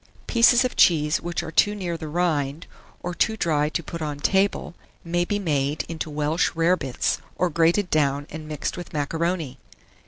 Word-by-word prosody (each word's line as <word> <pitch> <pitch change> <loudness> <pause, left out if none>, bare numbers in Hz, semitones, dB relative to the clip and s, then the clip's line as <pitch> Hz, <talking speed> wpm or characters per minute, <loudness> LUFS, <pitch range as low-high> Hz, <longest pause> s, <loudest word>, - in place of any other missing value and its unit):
Pieces 240 +1 +5
of 250 - -2
cheese 150 -2 +4
which 170 0 -3
are 160 - -6
too 205 +5 +3
near 180 -4 -3
the 160 -1 -6
rind, 155 -2 -1 0.4
or 175 - -3
too 220 +5 +1
dry 150 -5 +1
to 170 - -3
put 165 +2 -7
on 150 -2 -3
table, 195 +2 +1 0.3
may 175 +1 0
be 205 +4 -1
made 150 -6 -1
into 160 -1 -5
Welsh 150 +2 0
rare 165 +2 +3
bits, 130 -7 -2 0.2
or 180 -1 0
grated 170 +4 +2
down 145 -2 +1
and 155 0 -7
mixed 150 -2 -3
with 175 - -8
macaroni. 160 -2 -2
165 Hz, 180 wpm, -24 LUFS, 150-175 Hz, 0.4 s, Pieces